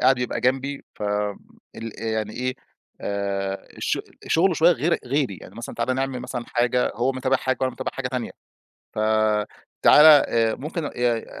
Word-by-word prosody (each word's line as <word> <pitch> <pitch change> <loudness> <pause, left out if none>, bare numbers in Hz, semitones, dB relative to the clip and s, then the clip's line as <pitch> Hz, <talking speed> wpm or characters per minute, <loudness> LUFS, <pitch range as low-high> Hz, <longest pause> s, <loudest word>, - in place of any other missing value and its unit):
قاعد 130 0 +4
يبقى 125 - -2
جنبي 135 +2 -1
ف - - -10 0.7
ال 115 -1 -6
يعني 110 -1 -2
إيه، 130 +1 -2 0.5
آآ 100 -1 -3
الش - - -1 0.3
شُغله 175 +2 +3
شوية 170 +3 +5
غير 170 +1 0
غيري، 130 -6 0
يعني - - -13
مثلًا 115 - -7
تعالَ 120 +2 0
نعمل 135 -1 -2
مثلًا 125 -1 -5
حاجة، 125 +1 +1
هو 125 +4 +1
متابع 130 +1 +1
حاجة 130 0 -1
وأنا 130 -1 0
متابع 130 +1 -4
حاجة 135 -2 -3
تانية 125 -1 -3 0.7
ف - - -2 0.8
تعالَ 150 - +8
آآ 115 -7 +6
ممكن 155 +3 -4
ي 120 -2 0
125 Hz, 165 wpm, -24 LUFS, 115-135 Hz, 0.8 s, تعالَ